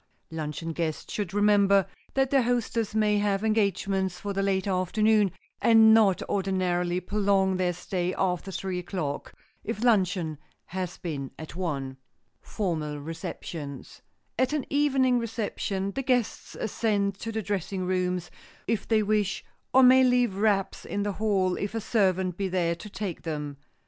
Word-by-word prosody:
Luncheon 160 +1 -4
guests 160 -2 -3
should 205 -5 -2
remember 200 -1 +4 0.3
that 270 -1 +2
their 275 -1 +5
hostess 230 -3 -1
may 210 -1 +3
have 205 0 0
engagements 195 -3 0
for 200 -1 -4
the 195 - 0
late 195 -1 +1
afternoon, 205 +2 +2 0.3
and 225 -1 +7
not 210 -5 +4
ordinarily 180 -2 0
prolong 195 0 +1
their 180 -1 +1
stay 180 +1 -2
after 180 0 -1
three 185 -1 -3
o'clock—if 180 +5 -5
luncheon 185 - +2 0.3
has 180 -1 -4
been 140 -6 -4
at 160 0 -9
one. 140 -7 -3 0.4
[Sidenote: - - -19
FORMAL 160 -8 -2
RECEPTIONS] 150 -1 -7 0.4
At 260 +3 +2
an 300 -3 -1
evening 270 -3 +3
reception, 205 -4 -3
the 270 - -3
guests 250 -4 -1
ascend 205 -2 0
to 225 - -4
the 220 -1 -3
dressing 190 -1 -2
rooms, 180 -1 -1 0.3
if 220 -4 -1
they 220 -2 +3
wish, 205 -2 0 0.3
or 265 +1 +6
may 260 +1 +7
leave 245 -4 +3
wraps 195 -1 0
in 205 - -2
the 205 - -1
hall, 195 -3 +1
if 205 +2 -3
a - - 0
servant 190 -5 +1
be 195 - -1
there 175 -2 +1
to 170 +5 -9
take 195 -3 -5
them. 150 -3 -4
195 Hz, 150 wpm, -27 LUFS, 180-215 Hz, 0.4 s, and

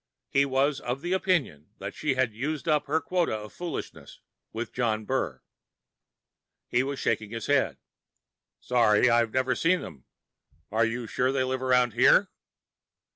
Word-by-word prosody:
He 140 0 +4
was 135 +1 +1
of 125 +3 -4
the 175 +2 -2
opinion 160 - 0
that 100 +1 -6
she 150 -3 -1
had 130 -4 +1
used 145 +8 -4
up 150 -2 +2
her 155 +3 +2
quota 175 -7 0
of 105 0 -8
foolishness 175 -4 -7 0.3
with 115 +2 -5
John 110 -3 -1
Burr. 130 +3 -2 1.2
He 120 - +2
was 140 +1 -3
shaking 110 -4 -1
his 115 +1 -5
head. 145 -2 +1 0.8
"Sorry, 120 -1 +3
I've 115 -1 +3
never 130 +1 +1
seen 180 +6 +2
them. 65 - -10 0.7
Are 110 +2 +3
you 120 +1 -4
sure 125 +3 0
they 135 -1 +1
live 130 0 -2
around 125 -2 +3
here?" - - +5
130 Hz, 155 wpm, -27 LUFS, 115-140 Hz, 1.2 s, here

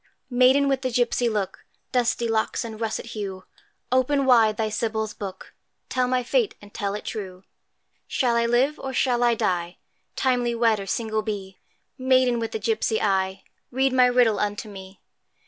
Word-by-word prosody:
Maiden 255 +3 +5
with 270 -1 +1
the 255 - -1
gipsy 240 0 +1
look, 210 -4 -3 0.3
Dusky 240 -1 +1
locks 225 +1 0
and 220 -1 -8
russet 225 -1 -2
hue, 195 -3 -5 0.5
Open 265 +2 +2
wide 225 -4 +5
thy 220 - 0
Sybil's 220 0 -2
book, 195 -2 -8 0.4
Tell 255 -1 +1
my 250 0 +1
fate 450 - +1
and 205 0 -16
tell 200 -1 -2
it 210 - -7
true; 190 -3 -6 0.6
Shall 245 -3 +1
I 235 0 +2
live? 260 +6 +2
or 265 - -5
shall 250 -2 +1
I 240 -1 +4
die? 175 -4 -1 0.4
Timely 245 -2 +1
wed, 230 -2 +2
or 195 - -6
single 220 +1 -1
be? 200 -3 -6 0.4
Maiden 255 -2 +3
with 225 -1 -3
the - - -2
gipsy 220 0 0
eye, 190 -1 0 0.3
Read 265 +1 +1
my 255 -1 +6
riddle 245 -3 +3
unto 205 +1 -2
me! 190 -1 -11
230 Hz, 170 wpm, -24 LUFS, 210-250 Hz, 0.6 s, my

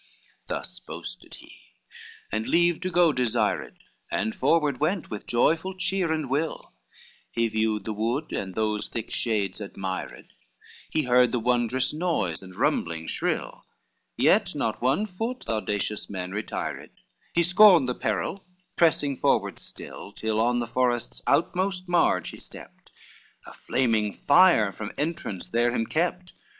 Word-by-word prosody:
XXVI - - -26
Thus - - -3
boasted - - -9
he, - - -15 0.8
and 110 +1 -2
leave 175 0 +3
to 185 - -1
go 175 -3 +4
desired, 125 -4 0 0.3
And 110 - -1
forward 145 -2 +2
went 175 +4 -1
with 105 - -6
joyful 165 +10 +1
cheer 190 -3 0
and 155 -3 -1
will, 145 +5 -2 0.6
He 115 0 0
viewed 110 -2 -1
the 110 - -2
wood 120 +8 -2
and 95 -2 -4
those 105 -1 -1
thick 115 -2 -5
shades 110 -3 0
admired, 95 -2 -6 0.6
He 155 - 0
heard 125 -1 +4
the 125 - 0
wondrous 120 +2 +1
noise 155 - -1
and 95 -1 -11
rumbling 80 -1 0
shrill; - - -2 0.5
Yet - - +3
not - - -2
one 135 - +2
foot 225 +6 -4
the 115 - -2
audacious 105 -1 -2
man 90 -2 -5
retired, 105 +2 -4 0.5
He 170 - +4
scorned 180 -4 +7
the 125 - 0
peril, 195 +9 -2 0.3
pressing 150 -4 +3
forward - - +1
still, 100 - -8
Till 110 0 -1
on 120 +2 +2
the 120 - -1
forest's 120 0 0
outmost 185 +2 +1
marge 165 - +2
he - - -10
stepped, - - -9 0.5
A - - -11
flaming 110 -5 0
fire 145 - +5
from 105 +1 -7
entrance 145 - -3
there 120 +1 +2
him 115 -2 0
kept. 180 +5 -2
125 Hz, 145 wpm, -26 LUFS, 110-170 Hz, 0.8 s, scorned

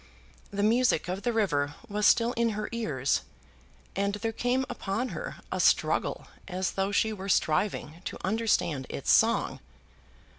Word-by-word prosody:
The 200 0 -2
music 235 -5 +3
of 185 +2 -3
the 240 - 0
river 145 -11 0
was 210 0 +2
still 235 +1 +4
in 230 -2 +1
her 215 - -3
ears, 145 - 0 0.7
and 200 +1 0
there 225 +2 -2
came 245 +3 0
upon 240 0 -3
her - - -5 0.2
a - - -2
struggle - - +2 0.2
as 185 -1 -2
though 195 +1 -1
she 220 +2 +2
were 195 -1 -6
striving 165 -1 0
to - - -4
understand 190 - 0
its - - -1
song. - - +3
205 Hz, 150 wpm, -28 LUFS, 185-230 Hz, 0.7 s, still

